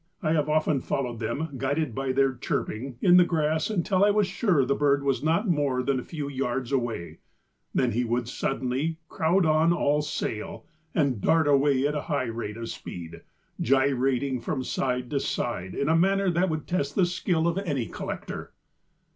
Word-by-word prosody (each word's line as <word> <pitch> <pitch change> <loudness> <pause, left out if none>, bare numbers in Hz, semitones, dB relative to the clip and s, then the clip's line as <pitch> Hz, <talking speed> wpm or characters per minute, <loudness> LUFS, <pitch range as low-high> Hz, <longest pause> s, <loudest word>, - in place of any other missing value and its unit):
I 155 - +1
have 155 -2 +1
often 155 -3 +2
followed 120 -4 -2
them, 140 +8 -2
guided 140 0 -1
by 135 +2 -1
their 135 0 +2
chirping, 120 0 -3
in 180 -1 +7
the 180 - +8
grass 160 -1 0
until 190 -1 +1
I 205 - +6
was 205 0 +3
sure 185 - +1
the 140 - +1
bird 140 -1 +2
was 135 -3 0
not 165 +8 +1
more 145 -7 +1
than 135 0 +1
a - - -6
few 150 -4 -5
yards 130 -2 -2
away; 120 -10 -2 0.6
then - - +2
he 120 +4 0
would 120 0 -1
suddenly 135 +5 -2
'crowd 175 +3 +2
on 155 +1 +4
all 150 -3 +2
sail' 120 -7 -4 0.3
and 135 -9 +1
dart 160 +4 +3
away 140 -1 +3
at 145 - +1
a 150 - -2
high 145 -4 +1
rate 115 -2 -5
of 115 0 -5
speed, 85 -1 -8 0.4
gyrating 130 0 +1
from 130 -3 -2
side 125 -1 -2
to 140 - +1
side 95 -9 -3
in 140 - -1
a 160 - +4
manner 195 +2 +3
that 175 +2 +1
would 155 -1 -3
test 145 -6 -2
the 190 - +4
skill 175 -2 0
of 170 +3 0
any 145 - -2
collector." 90 - -6
140 Hz, 185 wpm, -26 LUFS, 125-160 Hz, 0.6 s, the